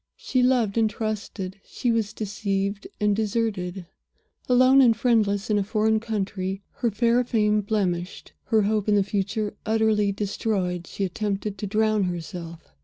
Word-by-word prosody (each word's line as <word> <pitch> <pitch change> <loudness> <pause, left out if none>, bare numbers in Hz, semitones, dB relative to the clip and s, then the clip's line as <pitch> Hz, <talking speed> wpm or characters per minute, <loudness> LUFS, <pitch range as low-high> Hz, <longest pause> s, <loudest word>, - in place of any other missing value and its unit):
She 255 - 0
loved 240 -4 +2
and 220 -1 +3
trusted; 205 -3 -4
she 245 - -2
was 225 -2 0
deceived 200 -1 -2
and 210 -1 +2
deserted. 200 -4 -2 0.6
Alone 255 +2 +6
and 230 -4 +5
friendless 215 -4 +1
in 205 - +3
a - - +1
foreign 220 +1 +1
country; 195 -3 -3
her 235 - +1
fair 235 +3 +2
fame 210 -3 +2
blemished; 190 -4 -2
her 220 -2 +3
hope 210 0 0
in 210 - +4
the 200 - +4
future 205 +2 -2
utterly 215 -2 +2
destroyed, 195 -3 -2
she 200 - -4
attempted 200 +2 -3
to 205 - -3
drown 215 0 +2
herself. 170 - -6
210 Hz, 150 wpm, -25 LUFS, 195-220 Hz, 0.6 s, Alone